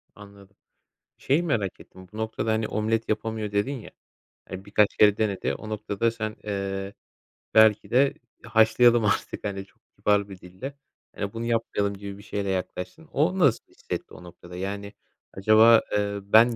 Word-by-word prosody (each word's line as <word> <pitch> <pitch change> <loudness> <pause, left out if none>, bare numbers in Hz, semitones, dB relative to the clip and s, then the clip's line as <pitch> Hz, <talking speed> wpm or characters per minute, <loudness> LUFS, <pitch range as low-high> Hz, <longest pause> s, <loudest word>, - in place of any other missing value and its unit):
Anladım. 100 -1 -15 0.6
Şeyi 150 +6 +1
merak 110 - -1
ettim, 95 0 -15
bu 110 - -9
noktada, 110 0 -2
hani, 110 0 0
omlet 110 +1 -1
yapamıyor 110 -1 -2
dedin 105 +7 0
ya, 120 -6 -9 0.6
hani, 95 +1 -7
birkaç 100 0 +2
kere 105 -1 +5
denedi. 105 -3 -1
O 110 - -9
noktada 110 +1 -1
sen, 110 -2 -5
eee, 100 -1 -3 0.6
belki 110 -1 +5
de 135 +3 +4 0.3
haşlayalım 115 0 +4
artık 100 - -1
hani, 100 -1 -4
çok - - -30
kibar 100 -1 +1
bir 95 - -10
dille, 95 +11 -9 0.4
hani, 100 0 -4
bunu 115 0 -4
yapmayalım 115 -3 0
gibi 100 0 -8
bir 100 - -13
şeyle 100 -1 -3
yaklaştın. 95 - -4
O 175 +7 +1
nasıl 140 -9 +3
bir - - -26
hissetti - - -6
o - - -12
noktada? 90 0 -12
Yani 100 +2 -5 0.4
acaba, 110 +3 +6
eee, 100 0 0
"Ben 110 +4 +5
105 Hz, 165 wpm, -25 LUFS, 100-115 Hz, 0.6 s, acaba